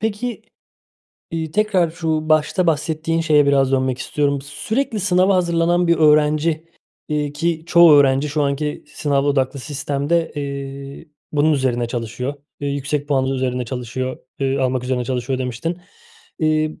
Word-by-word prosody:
peki, 220 +3 -3 0.9
iii, 160 -1 -3
tekrar 190 -3 +2
şu 160 -2 -2
başta 155 +4 +2
bahsettiğin 160 +1 0
şeye 150 -3 +4
biraz 135 -1 +3
dönmek 130 -1 +1
istiyorum. 140 +1 0
"Sürekli 225 - -2
sınava 185 0 +3
hazırlanan 175 0 +2
bir 170 -1 +3
öğrenci, 155 +1 +3 0.4
iii, 150 -1 -1
ki 160 +2 -1
çoğu 170 -2 +7
öğrenci 140 0 +4
şu 150 +1 0
anki 145 +1 -2
sınav 140 -2 -1
odaklı 140 -1 0
sistemde, 150 +3 -1
eee, 140 +1 -6 0.3
bunun 150 +1 +3
üzerine 125 -4 0
çalışıyor, 120 +4 -4 0.3
eee, 145 - -2
yüksek 140 +1 -2
puanlı 135 -1 +1
üzerine 125 -1 -1
çalışıyor, 130 +2 -4 0.2
ııı, 135 0 0
almak 130 -1 0
üzerine 125 -1 -1
çalışıyor." 130 +1 -2
demiştin. 130 +8 -3 0.6
İii, 155 0 0
150 Hz, 140 wpm, -20 LUFS, 135-165 Hz, 0.9 s, çoğu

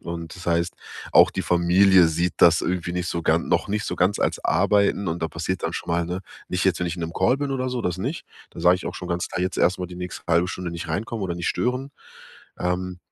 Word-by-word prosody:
und 85 -1 -6
das 95 -1 -11
heißt, 85 +1 +1 0.4
auch - - +7
die - - -3
Familie 90 +1 +5
sieht 85 +2 0
das 85 0 +6
irgendwie 85 -1 -2
nicht 90 -1 -2
so 85 - -2
gan 80 +1 +1
noch - - +1
nicht 105 0 -1
so - - -2
ganz 90 +3 +2
als - - -1
Arbeiten, 100 -1 +2
und 80 +1 -3
da 80 - 0
passiert 85 +4 -3
dann - - -2
schon - - -6
mal, 85 0 +1
ne 90 +2 -3 0.3
nicht 90 +1 -1
jetzt, 90 -2 +2
wenn 90 - 0
ich 85 - -4
in 85 - -5
'nem 80 0 -4
Call 125 +3 +3
bin 140 -1 -2
oder 130 -1 -1
so, 125 -1 -2
das 90 0 -1
nicht. 135 - -3 0.3
Dann - - -10
sage 90 +1 +6
ich - - -8
auch - - -4
schon 90 - -7
ganz 85 0 -2
klar: 90 - -4
„Jetzt 95 - -2
erstmal 90 0 +2
die 90 - -9
nächste 90 -1 -7
halbe 85 +1 +2
Stunde 90 -2 -4
nicht 85 -1 -6
reinkommen 105 +6 -3
oder 85 -2 -2
nicht 85 - -2
stören.“ 130 +3 -1 0.7
Ähm, 90 0 -2
90 Hz, 255 wpm, -24 LUFS, 85-95 Hz, 0.7 s, auch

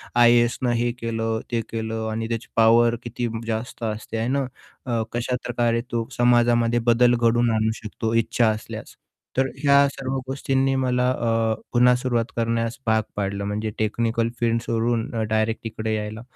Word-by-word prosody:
आय-ए-एसनं 120 +1 +4
हे 120 0 +1
केलं 115 -1 -2
ते 115 - +1
केलं 110 0 -3
आणि 115 +1 -3
त्याची 115 0 -3
पॉवर 115 +1 +5
किती 120 0 -3 0.2
जास्त 115 +1 -4
असते 110 +1 -4
आहे 115 +2 -1
ना, 135 0 +1 0.4
अ, 120 -2 0
कशाप्रकारे 120 -1 -1
तो 115 -1 -1
समाजामध्ये 120 -1 +3
बदल 120 +1 +4
घडवून 120 0 +2
आणू 110 0 +1
शकतो 110 +1 -3
इच्छा 115 +1 +2
असल्यास. 110 0 -6 0.4
तर 135 - +4 0.2
ह्या 140 0 +6
सर्व 135 -1 -5 0.2
गोष्टींनी 135 0 0
मला 125 0 +1
अ, 115 -2 +1 0.2
पुन्हा 125 +1 +5
सुरुवात 120 -2 0
करण्यास 115 0 -1
भाग 110 0 +3
पाडलं 100 0 -2
म्हणजे 105 +2 -2
टेक्निकल 115 +1 0
फील्ड 115 -1 +1
सोडून 115 +1 -1 0.2
डायरेक्ट 110 +1 0
तिकडे 110 -1 -3
यायला. 105 +1 -5
115 Hz, 150 wpm, -23 LUFS, 110-120 Hz, 0.4 s, ह्या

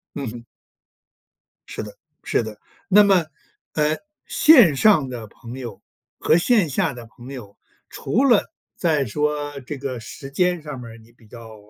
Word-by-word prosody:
嗯 140 -5 -4
哼。 120 -1 -10 1.2
是 - - -5
的 - - -11 0.3
是 - - +1
的， 110 -1 -8 0.3
那 205 +2 +7
么， 190 -4 +4 0.5
呃， 150 0 +1 0.3
线 245 - +6
上 150 -5 +4
的 115 -3 -7
朋 120 +4 -11
友 115 -6 -8 0.4
和 160 - +4
线 200 -2 +3
下 140 - 0
的 120 -1 -10
朋 120 +3 -14
友 105 -7 -10 0.3
除 255 +6 -1
了 240 -6 +3 0.2
在 155 -5 +1
说 145 +3 -2
这 140 +3 -7
个 130 -2 -5
时 135 +4 -10
间 180 +2 +1
上 150 -4 -7
面 115 - -9
儿 115 - -13
你 115 +1 -19
比 115 -2 -23
较， 115 -1 -12
140 Hz, 175 characters per minute, -22 LUFS, 120-170 Hz, 1.2 s, 那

